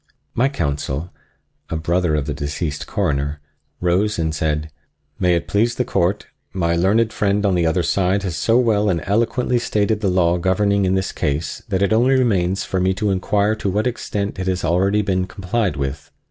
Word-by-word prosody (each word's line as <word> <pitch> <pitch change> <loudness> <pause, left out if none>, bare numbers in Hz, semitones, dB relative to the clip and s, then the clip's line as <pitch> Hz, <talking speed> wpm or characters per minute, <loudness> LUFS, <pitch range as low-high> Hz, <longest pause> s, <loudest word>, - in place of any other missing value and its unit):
My 130 +4 +2
counsel, 75 - -3 0.6
a - - -3
brother 85 0 0
of 75 -2 -1
the 75 - -3
deceased 75 +1 -4
Coroner, 75 -6 -1 0.4
rose 95 +5 +1
and 80 -2 -1
said: 75 0 -1 0.5
"May 90 -2 +3
it 85 - -2
please 115 +4 +1
the 125 - -1
Court, 100 -4 0 0.3
my 85 -3 0
learned 105 +6 +2
friend 105 -1 +1
on 100 - +3
the 85 -2 +2
other 85 +2 +1
side 95 +3 +1
has 90 -4 -3
so 115 +10 +2
well 105 -4 +2
and 85 -4 0
eloquently 120 +4 +1
stated 110 -2 0
the 100 - +1
law 90 -1 +2
governing 100 +2 +2
in 95 0 +2
this 95 0 -1
case 75 0 -2
that 95 +1 +1
it 100 - +2
only 125 +4 +4
remains 95 -7 +1
for 95 - -2
me 95 +1 +1
to 105 0 0
inquire 100 +2 +1
to 100 - -2
what 105 +4 0
extent 105 -5 -3
it 95 - -3
has 90 -1 -1
been 85 - +1
already 100 +4 +2
complied 95 0 -1
with. 70 +1 -4
95 Hz, 190 wpm, -20 LUFS, 85-105 Hz, 0.6 s, only